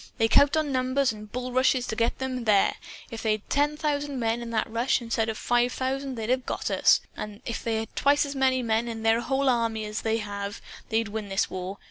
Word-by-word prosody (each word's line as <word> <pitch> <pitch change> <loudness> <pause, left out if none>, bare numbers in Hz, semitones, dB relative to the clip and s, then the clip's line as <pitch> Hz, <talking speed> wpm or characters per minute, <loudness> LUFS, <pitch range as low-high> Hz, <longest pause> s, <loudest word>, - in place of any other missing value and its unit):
"They 225 -2 +3
count 285 +6 +5
on 305 -2 0
numbers 260 +1 +1
and 210 -1 -11
bullrushes 255 0 +1
to 220 - -3
get 230 +1 0
them 255 -2 -3
there. 205 -3 +3 0.3
If 230 - -6
they'd 215 -1 0
had - - -33
ten 295 +1 +2
thousand 290 -2 -1
men, 230 0 0
in 235 - -6
that 225 -1 0
rush, 230 +3 +1
instead 230 -2 -1
of 220 - -3
five 245 0 +2
thousand, 265 +1 -2
they'd 225 +1 -2
have 255 0 +1
got - - -2
us. - - +4
And 210 -1 -7
if 230 - -4
they 230 -1 0
had 220 0 -4
twice 285 +1 +3
as 285 - -5
many 260 -1 +2
men 225 +1 +1
in 225 -1 -5
their 225 +1 +3
whole 270 +3 0
army 230 -3 +1
as 210 +1 -4
they 225 0 0
have, 205 -1 -5 0.3
they'd 225 -1 0
win 210 -1 -5
this 195 0 0
war. 185 +2 -5
235 Hz, 230 wpm, -26 LUFS, 220-260 Hz, 0.3 s, count